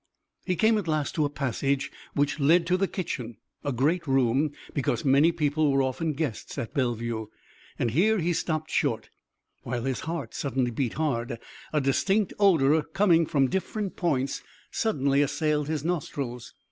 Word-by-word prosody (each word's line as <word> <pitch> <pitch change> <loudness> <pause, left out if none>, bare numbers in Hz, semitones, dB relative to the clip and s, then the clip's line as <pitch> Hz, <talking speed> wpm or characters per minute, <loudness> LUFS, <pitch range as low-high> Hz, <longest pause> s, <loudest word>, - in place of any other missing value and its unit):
He 180 - +1
came 220 +3 +3
at 190 - -5
last 155 -2 0
to 155 -5 +1
a - - -1
passage 140 0 -1 0.2
which 145 +1 +1
led 165 +5 +4
to 180 +1 +2
the 195 +1 +1
kitchen, 125 - -4 0.3
a 140 - -1
great 150 +7 +1
room, 135 +2 +2 0.2
because 125 -3 -1
many 140 +5 +5
people 155 -2 +1
were 135 0 +3
often 150 +5 -1
guests 145 -6 -4
at 115 - -4
Bellevue, 115 -5 -1 0.5
and 120 - 0
here 205 - +3
he 175 -1 +1
stopped 155 -1 -2
short, - - 0 0.5
while 120 -1 -3
his 135 -1 -1
heart 165 0 -4
suddenly 130 -3 -1
beat 120 0 -1
hard. 120 -7 -1 0.3
A 150 - +2
distinct 190 +9 +1
odor 160 -6 +5
coming 170 -1 +3
from 135 -3 +2
different 190 - -3
points 140 -7 0 0.3
suddenly 140 -10 +1
assailed 150 +1 0
his 155 -1 -2
nostrils. 140 -8 -3
145 Hz, 160 wpm, -27 LUFS, 130-165 Hz, 0.5 s, many